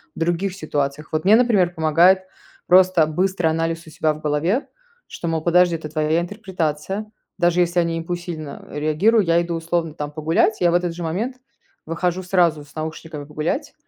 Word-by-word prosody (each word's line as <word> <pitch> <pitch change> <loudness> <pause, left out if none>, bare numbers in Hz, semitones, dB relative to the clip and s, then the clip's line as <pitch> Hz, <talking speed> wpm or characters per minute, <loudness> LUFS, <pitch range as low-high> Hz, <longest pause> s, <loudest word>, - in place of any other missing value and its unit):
в - - -9
других 175 +3 0
ситуациях? 150 -4 -3
Вот 155 0 0
мне, 210 +4 +6
например, 205 -8 +3
помогает 170 +4 +4 0.4
просто 180 -2 +5
быстрый 180 +2 0
анализ 165 +1 -2
у - - -9
себя 155 0 0
в 150 - -10
голове, 155 - 0 0.4
что, 170 - -5
мол: 160 -1 -1
"Подожди, 175 +1 +3
это 155 -1 -6
твоя 155 +1 +1
интерпретация". 190 0 -3 0.3
Даже 175 0 +3
если 175 0 +1
они 170 -1 0
импульсивно 165 -3 -6
реагирую, 155 +9 +2
я 170 0 +3
иду, 170 0 -3
условно 165 -1 -2
там, 150 -1 -5
погулять. 160 +8 +1
Я 175 -1 +3
в - - -1
этот 175 -1 +1
же 175 +1 -6
момент 215 +11 -3 0.5
выхожу 175 +3 -1
сразу 170 -5 +1
с 140 - -21
наушниками 155 -1 -6
погулять, 155 - -3
170 Hz, 175 wpm, -21 LUFS, 155-180 Hz, 0.5 s, мне